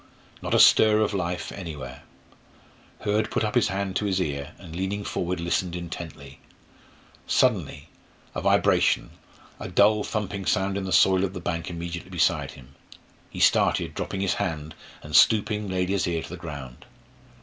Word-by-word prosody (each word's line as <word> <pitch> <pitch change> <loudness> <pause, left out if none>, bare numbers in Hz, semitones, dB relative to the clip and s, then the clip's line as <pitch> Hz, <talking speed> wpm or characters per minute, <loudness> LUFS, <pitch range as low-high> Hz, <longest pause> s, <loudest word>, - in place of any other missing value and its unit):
Not - - -1
a - - +4
stir 110 -1 +6
of 105 -1 0
life 90 -2 -3
anywhere. 75 -8 -7 1.0
Hurd 105 +1 0
put - - -1
up 105 -1 -1
his 120 - +3
hand 95 0 -3
to 105 - -1
his 95 -2 0
ear, 70 -4 -3
and 85 -4 -11
leaning 95 +3 -2
forward 90 -2 -3
listened 85 +1 -1
intently. 80 -5 -8 0.9
Suddenly - - +1 0.5
a - - -3
vibration, - - +2 0.5
a - - -6
dull 105 +1 +4
thumping 100 -3 -4
sound 95 +1 +1
in 100 -1 -3
the 95 - -4
soil 95 +3 +5
of 95 -1 -2
the 90 - -5
bank 85 -1 -3
immediately 85 0 -6
beside - - 0
him. 65 0 -15 0.6
He - - -8
started, - - +3
dropped - - -5
his 95 -1 0
hand, 80 -5 -3 0.3
and, 75 0 -5
stooping, 105 -1 +4
laid 90 -1 -1
his 95 -2 0
ear 85 -2 -1
to - - -9
the 90 - -6
ground. 70 -8 -9
90 Hz, 165 wpm, -25 LUFS, 85-100 Hz, 1.0 s, stir